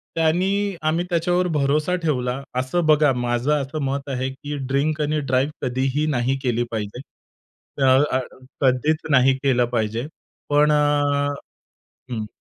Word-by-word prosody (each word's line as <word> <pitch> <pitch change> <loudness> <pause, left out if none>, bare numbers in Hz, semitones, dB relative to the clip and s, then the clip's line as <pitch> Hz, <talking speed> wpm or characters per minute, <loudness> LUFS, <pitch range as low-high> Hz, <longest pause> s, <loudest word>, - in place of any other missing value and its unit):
त्यांनी 190 +5 +1
आम्ही 160 +3 0
त्याच्यावर 175 +1 +1
भरोसा 150 +5 +1
ठेवला. 130 -4 -1 0.2
असं 155 +6 -1
बघा 150 -2 +4
माझं 120 +2 -1
असं 140 +3 -5
मत 140 +1 -3
आहे, 130 0 -2
की 145 +2 -7
ड्रिंक 150 +3 0
आणि 150 +1 0
ड्राइव्ह 135 0 -1
कधीही 130 +4 0
नाही 125 +3 0
केली 120 -2 +1
पाहिजे. 110 +2 -4 0.8
अ - - +5 0.3
अ - - 0 0.4
कधीच 135 +4 +2
नाही 135 -1 +5
केलं 125 -3 +3
पाहिजे. 115 +3 -1 0.4
पण 150 +1 +4
अ - - +4 1.4
हं. 110 -2 -3
140 Hz, 135 wpm, -22 LUFS, 125-155 Hz, 1.4 s, अ